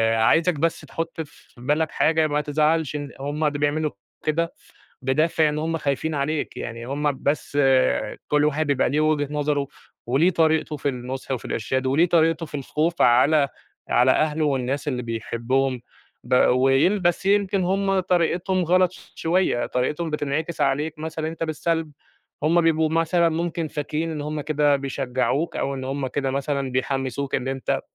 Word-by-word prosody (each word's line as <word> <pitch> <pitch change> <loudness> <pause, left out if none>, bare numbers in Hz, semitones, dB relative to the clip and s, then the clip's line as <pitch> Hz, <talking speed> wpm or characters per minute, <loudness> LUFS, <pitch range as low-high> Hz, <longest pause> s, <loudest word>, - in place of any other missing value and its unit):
عايزك 165 +11 +3
بس 165 +2 0
تحُط 165 0 -5
في 145 -5 -14
بالك 150 +4 0
حاجة، 160 0 +2
ما 150 0 0
تزعلش 150 +1 +1
إن 145 -3 -5
هم 145 +3 -1
ده 145 -1 -2
بيعملوا 150 +1 0 0.3
كده 165 +2 0 0.5
بدافِع 155 +4 +2
إن 150 - -2
هم 165 +1 -1
خايفين 155 +1 -1
عليك. 145 +2 -2
يعني 115 0 -6
هم 145 0 -2
بس 145 0 -1 0.7
كل 150 0 +3
واحد 150 +1 +1
بيبقى 140 -2 +2
ليه 150 +3 +1
وِجهة 155 -2 +1
نظره 145 -1 0 0.4
وليه 145 +9 +3
طريقته 160 -2 +1
في 145 - -2
النُصح 130 +1 -5
وفي 130 - -2
الإرشاد 130 +4 -2
وليه 150 +7 +3
طريقته 165 0 +2
في 150 - -17
الخوف 160 +5 -1
على 140 +4 +4 0.4
على 125 +1 +4
أهله 155 +3 +2
والناس 140 +1 -1
اللي 125 -3 -2
بيحبّهم. 120 +3 -1 0.4
ب - - 0
وين 135 +10 +3
بس 175 +2 +1
يمكن 200 -1 +2
هم 195 +1 +1
طريقتهم 180 +1 +1
غلط 180 +1 +3
ش - - -16
شوية، 165 -7 +1
طريقتهم 150 +6 -1
بتنعكس 150 +2 -2
عليك 150 +3 0
مثلًا 160 0 -4
أنت 165 0 -4
بالسلب، 160 0 -2 0.5
هم 165 +3 +4
بيبقوا 160 -1 +2
مثلًا 165 +1 +2
ممكن 165 0 -2
فاكرين 155 +2 -3
إن 150 - -4
هم 150 +1 -3
كده 145 -1 +2
بيشجّعوك 135 +3 -1
أو 140 0 -1
إن 130 - -5
هم 135 +1 -2
كده 135 +1 -2
مثلًا 140 -1 -2
بيحمّسوك 135 +1 -2
إن 130 - -1
أنت 135 -1 -1
150 Hz, 160 wpm, -23 LUFS, 135-165 Hz, 0.7 s, على